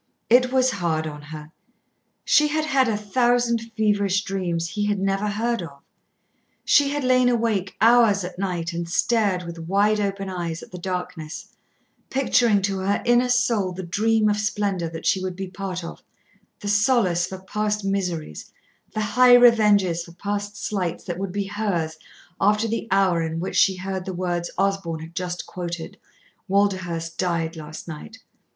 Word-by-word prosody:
It 250 Hz, +1 st, +5 dB
was 260 Hz, 0 st, +3 dB
hard 165 Hz, -6 st, -1 dB
on 150 Hz, -1 st, -7 dB
her. 150 Hz, 0 st, -10 dB, 0.7 s
She 300 Hz, -, +5 dB
had 310 Hz, +1 st, -1 dB
had 270 Hz, -4 st, +2 dB
a 220 Hz, -2 st, 0 dB
thousand 240 Hz, +2 st, +1 dB, 0.2 s
feverish 205 Hz, -2 st, +2 dB
dreams 175 Hz, -3 st, -2 dB
he 205 Hz, +4 st, -2 dB
had 205 Hz, -1 st, +1 dB
never 195 Hz, +2 st, 0 dB
heard 230 Hz, +2 st, -1 dB
of. 140 Hz, -5 st, -10 dB, 0.8 s
She 285 Hz, -1 st, +4 dB
had 290 Hz, 0 st, -2 dB
lain 255 Hz, -1 st, +4 dB
awake 225 Hz, -5 st, 0 dB
hours 225 Hz, -3 st, +5 dB
at 180 Hz, 0 st, -7 dB
night 175 Hz, -3 st, -2 dB
and 170 Hz, 0 st, -4 dB
stared 200 Hz, -2 st, +1 dB
with 170 Hz, -1 st, -8 dB
wide 200 Hz, +5 st, +2 dB
open 195 Hz, -1 st, -2 dB
eyes 170 Hz, -3 st, -4 dB
at -, -, -14 dB
the 180 Hz, -, -8 dB
darkness, 180 Hz, -3 st, -6 dB, 0.5 s
picturing 240 Hz, -6 st, +2 dB
to 195 Hz, 0 st, -1 dB
her 195 Hz, +2 st, 0 dB
inner 240 Hz, +1 st, +3 dB
soul 230 Hz, -6 st, +1 dB
the 185 Hz, +1 st, -6 dB
dream 215 Hz, +5 st, +1 dB
of 210 Hz, 0 st, +2 dB
splendour 205 Hz, -4 st, -1 dB
that 165 Hz, 0 st, -8 dB
she 190 Hz, -, +2 dB
would 185 Hz, -1 st, -4 dB
be 190 Hz, +1 st, -5 dB
part 185 Hz, -1 st, -5 dB
of, 170 Hz, -, -8 dB, 0.6 s
the 205 Hz, -, -6 dB
solace 205 Hz, -4 st, +2 dB
for 190 Hz, -, -7 dB
past 210 Hz, +2 st, -2 dB
miseries, 180 Hz, -, -3 dB, 0.4 s
the 215 Hz, -, 0 dB
high 245 Hz, +4 st, +6 dB
revenges 210 Hz, -8 st, +5 dB
for 170 Hz, -, -14 dB
past 205 Hz, +2 st, -4 dB
slights 185 Hz, -5 st, -3 dB
that 175 Hz, 0 st, -5 dB
would 195 Hz, -1 st, -3 dB
be 200 Hz, +1 st, -2 dB
hers 195 Hz, -6 st, -2 dB, 0.4 s
after 210 Hz, +2 st, +2 dB
the 230 Hz, 0 st, -3 dB
hour 190 Hz, -3 st, +3 dB
in 165 Hz, 0 st, -3 dB
which 180 Hz, -, -4 dB
she 190 Hz, -, +4 dB
heard 190 Hz, 0 st, -4 dB
the 190 Hz, -, -4 dB
words 175 Hz, -1 st, -2 dB
Osborn 195 Hz, -5 st, -1 dB
had 165 Hz, +1 st, -10 dB
just 180 Hz, 0 st, -4 dB
quoted, 175 Hz, -2 st, -6 dB, 0.5 s
"Walderhurst 185 Hz, -4 st, 0 dB
died 170 Hz, -2 st, -1 dB
last 155 Hz, 0 st, -9 dB
night!" 170 Hz, +8 st, -9 dB
195 Hz, 170 wpm, -23 LUFS, 175-215 Hz, 0.8 s, high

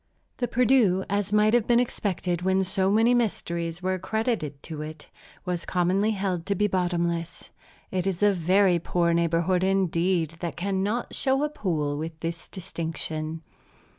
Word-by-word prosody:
The 245 Hz, -, -1 dB
Perdu, 235 Hz, -7 st, +3 dB
as 200 Hz, -1 st, 0 dB
might 210 Hz, +1 st, +4 dB
have 240 Hz, -3 st, +3 dB
been 240 Hz, 0 st, +5 dB
expected 185 Hz, -7 st, -1 dB
when 190 Hz, +1 st, +2 dB
so 190 Hz, 0 st, +1 dB
many 225 Hz, +4 st, +4 dB
mysteries 170 Hz, -7 st, -1 dB
were 185 Hz, 0 st, 0 dB
credited 190 Hz, -, -2 dB
to 155 Hz, -2 st, -6 dB
it, 155 Hz, 0 st, -9 dB, 0.3 s
was 180 Hz, -2 st, -2 dB
commonly 185 Hz, +4 st, +1 dB
held 190 Hz, -5 st, -2 dB
to 200 Hz, -, +1 dB
be 210 Hz, -, +2 dB
bottomless. 170 Hz, -3 st, -1 dB, 0.4 s
It 185 Hz, 0 st, -1 dB
is 190 Hz, 0 st, -1 dB
a 205 Hz, -1 st, +5 dB
very 185 Hz, +1 st, +3 dB
poor 170 Hz, 0 st, +1 dB
neighborhood 170 Hz, +2 st, +1 dB
indeed, 180 Hz, -3 st, +1 dB
that 170 Hz, -2 st, -4 dB
cannot 200 Hz, +5 st, -1 dB
show 270 Hz, +1 st, +1 dB
a 300 Hz, -, +1 dB
pool 155 Hz, -, -2 dB
with 160 Hz, 0 st, -6 dB
this 165 Hz, +1 st, -4 dB
distinction. 160 Hz, -3 st, -5 dB
185 Hz, 155 wpm, -26 LUFS, 170-205 Hz, 0.4 s, been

